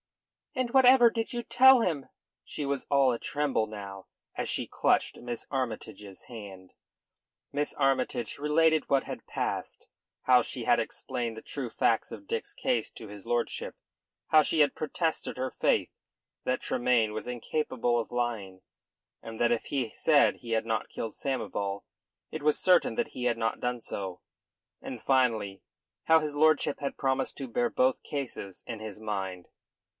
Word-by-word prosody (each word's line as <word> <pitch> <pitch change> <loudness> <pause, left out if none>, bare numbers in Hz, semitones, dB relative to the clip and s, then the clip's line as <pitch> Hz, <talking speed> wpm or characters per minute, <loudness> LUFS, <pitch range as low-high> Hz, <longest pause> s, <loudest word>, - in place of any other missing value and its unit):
"And 255 -2 -1
whatever 255 -2 +7
did 225 -1 -2
you 240 -1 -3
tell 265 +1 +7
him?" 165 - -1 0.4
She 150 - -5
was 140 -1 -2
all 140 -2 +4
a 115 - -4
tremble 145 -7 0
now, 100 -2 -8 0.3
as - - -2
she - - -1
clutched - - +1
Miss 120 -1 -5
Armytage's 110 -6 -5
hand. 100 -6 -10 0.8
Miss 145 +1 -1
Armytage 130 -4 0
related 155 +1 +2
what 135 -1 +3
had - - -7
passed; - - -4 0.4
how 125 -1 +6
she - - -4
had - - +4
explained 120 -3 -3
the - - -7
true 135 -4 -5
facts 115 0 +1
of 295 - -9
Dick's 425 -3 -3
case 260 -9 0
to 110 - -9
his 100 -1 -11
lordship; 120 -1 -2 0.5
how 155 - +7
she 155 - +1
had 145 -2 +4
protested 160 0 -2
her 130 +1 -2
faith - - +1 0.5
that 130 - 0
Tremayne 120 -3 +1
was 110 - -5
incapable 125 0 -1
of 115 - -3
lying, 110 -6 -3 0.6
and 115 -1 -8
that 120 0 +3
if 115 - -2
he 130 -6 -2
said 150 -3 +4
he 115 - -9
had 110 0 +1
not 110 -3 -1
killed 115 - -5
Samoval 100 -7 -3 0.5
it 155 - -5
was 150 0 +2
certain 180 -2 +4
that 240 - -1
he 125 - -5
had 120 -1 +2
not 115 0 -1
done 125 0 -1
so; 95 -5 -5 0.6
and, 125 -4 -7
finally, 110 -7 +1 0.4
how 160 0 +6
his 150 -2 -3
lordship 155 -1 +3
had 140 -1 -4
promised 135 0 -1
to 135 - -5
bear 120 0 0
both 130 0 +1
cases 125 -9 -5
in 115 -3 -6
his 110 -2 -7
mind. 95 -4 -4
125 Hz, 165 wpm, -29 LUFS, 110-150 Hz, 0.8 s, whatever